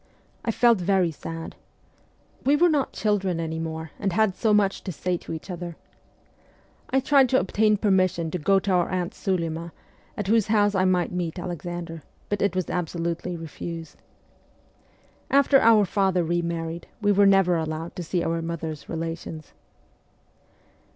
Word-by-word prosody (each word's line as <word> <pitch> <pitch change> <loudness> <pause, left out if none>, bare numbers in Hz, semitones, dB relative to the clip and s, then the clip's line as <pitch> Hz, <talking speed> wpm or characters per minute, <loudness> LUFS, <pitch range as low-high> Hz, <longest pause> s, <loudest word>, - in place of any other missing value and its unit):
I - - -2
felt 235 -1 +4
very 185 -2 +2
sad. 165 +1 -7 0.9
We 280 +2 +4
were 345 +4 +4
not 290 -4 +1
children 195 -5 0
any 160 0 -3
more, 160 -1 -5
and 195 -3 -1
had 215 0 +3
so 220 - +1
much 205 -2 +2
to 190 - -3
say 180 +2 -2
to - - -10
each 165 +4 -6
other. 175 -1 -6 1.1
I 265 - +3
tried 270 -1 +4
to 260 - +4
obtain 210 +2 +2
permission 185 -5 +1
to 180 - -2
go 195 +6 +3
to 195 +1 0
our 180 -2 +2
aunt 180 +2 -2
Sulima, 170 -4 -2 0.5
at 205 - -2
whose 220 +1 +3
house 205 -1 +3
I 190 -1 +2
might 180 -2 +1
meet 175 -1 -3
Alexander, 175 -1 -5 0.3
but 205 -1 -1
it 200 -2 +1
was 185 -2 -1
absolutely 170 0 -3
refused. 165 0 -8 1.3
After 275 0 +5
our 220 -2 +6
father 190 -2 +1
re 175 +1 0
married 170 0 -4
we 205 -2 +2
were 200 0 +5
never 195 -3 +4
allowed 160 +1 -3
to - - -4
see 175 +1 -1
our 165 0 -1
mother's 165 -2 -5
relations. 165 -1 -5
180 Hz, 160 wpm, -25 LUFS, 165-205 Hz, 1.3 s, our